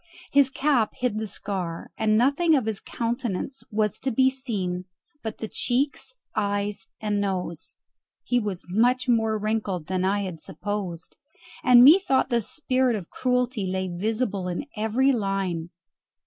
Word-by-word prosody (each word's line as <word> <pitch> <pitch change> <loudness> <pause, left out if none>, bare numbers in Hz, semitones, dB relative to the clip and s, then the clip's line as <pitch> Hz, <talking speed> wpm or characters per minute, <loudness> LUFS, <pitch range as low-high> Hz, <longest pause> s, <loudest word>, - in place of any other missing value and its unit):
His 280 -1 +5
cap 265 -5 +1
hid 245 -4 -1
the 220 - -3
scar, 180 -5 -4
and 215 -1 +2
nothing 285 +7 +4
of 260 -6 +1
his 220 -2 -2
countenance 235 +2 -3
was 215 -2 0
to 270 - -1
be 260 +2 +3
seen 195 -9 -3 0.4
but 220 -1 -5
the 220 - -4
cheeks, 270 - -1 0.2
eyes, 205 -1 -1
and 210 -1 0
nose; 180 -4 -3 0.5
he 245 - +1
was 205 -5 -4
much 245 +7 +2
more 225 -2 +2
wrinkled 210 -5 -2
than 185 +2 -1
I 200 +2 +1
had 180 -5 -5
supposed, 195 -4 -5 0.5
and 245 -1 +8
methought 295 -2 +6
the 235 -1 +3
spirit 255 +1 0
of 190 -6 -7
cruelty 250 -5 0
lay 185 0 -2
visible 205 -1 -1
in 180 +9 -3
every 225 +5 +2
line. 195 -7 -1
215 Hz, 150 wpm, -25 LUFS, 195-250 Hz, 0.5 s, and